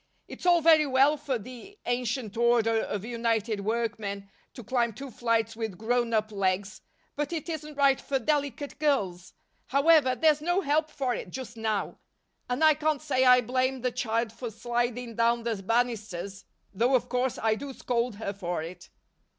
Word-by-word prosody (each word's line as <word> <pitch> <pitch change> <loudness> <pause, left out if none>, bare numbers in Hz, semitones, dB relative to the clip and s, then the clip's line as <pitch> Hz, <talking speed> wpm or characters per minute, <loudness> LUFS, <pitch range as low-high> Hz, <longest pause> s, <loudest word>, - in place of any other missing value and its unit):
It's - - -6
all 345 -1 +5
very 310 -2 +6
well 270 +3 +4
for 280 -3 -2
the 255 - -11
Ancient 245 -2 -2
Order 230 -1 +3
of 205 -2 -3
United 230 -2 -1
Workmen 205 -2 -3 0.2
to 245 - -8
climb 235 0 0
two 270 +5 -8
flights 230 -1 0
with 220 -5 -4
grown 240 +2 0
up 215 -1 0
legs, 195 0 -1 0.3
but 295 +1 -2
it 330 -2 -4
isn't 305 -2 -5
right 275 -1 +3
for 275 - -1
delicate 285 +1 -2
girls. 200 - -1 0.3
However, 280 -1 +4
there's 305 0 +3
no 350 +4 +1
help 305 0 +1
for 265 -4 -2
it 195 - -5
just 250 +3 -7
now, 220 -3 -2 0.5
and 250 +5 0
I 310 0 +7
can't 305 -1 0
say 260 -4 +1
I 250 0 +7
blame 255 +2 0
the 250 0 0
child 230 -2 -1
for 240 0 -6
sliding 240 +1 -2
down 235 0 +2
the 225 -4 -2
banisters, 200 -4 -2 0.3
though 240 +7 +2
of 250 -1 +1
course 250 0 -1
I 220 -1 +1
do 275 +5 -6
scold 245 -3 -2
her 205 -1 -4
for 175 -4 -3
it." 175 +2 -10
240 Hz, 175 wpm, -28 LUFS, 220-275 Hz, 0.5 s, I